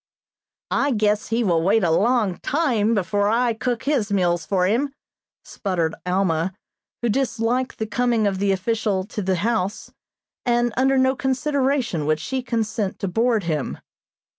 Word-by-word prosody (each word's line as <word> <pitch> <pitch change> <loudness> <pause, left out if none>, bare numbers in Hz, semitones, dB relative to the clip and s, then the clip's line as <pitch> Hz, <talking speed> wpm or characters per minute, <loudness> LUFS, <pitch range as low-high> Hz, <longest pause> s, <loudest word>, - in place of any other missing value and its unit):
"I 280 -1 +2
guess 210 -1 +1
he 235 +1 0
will 170 -6 +2
wait 200 +5 +3
a 170 - +2
long 210 0 +2
time 240 -8 +1
before 205 +1 +1
I 235 +1 +2
cook 235 +1 -2
his 260 -8 0
meals 175 -4 +1
for 185 -2 +2
him," 270 +8 0 0.5
sputtered 170 -5 -2
Alma, 180 -1 0 0.5
who 240 - +2
disliked 250 +1 0
the 220 - -2
coming 235 0 +1
of 195 -2 0
the 200 0 +2
official 200 0 0
to 210 +2 -5
the 190 -1 0
house, 210 +1 -1 0.5
and 240 -1 +1
under 265 +2 +3
no 260 0 +3
consideration 265 - 0
would 155 0 +2
she 260 +11 -3
consent 220 -4 -2
to 195 - -3
board 225 +2 +1
him. 155 -4 -2
220 Hz, 155 wpm, -22 LUFS, 190-245 Hz, 0.5 s, wait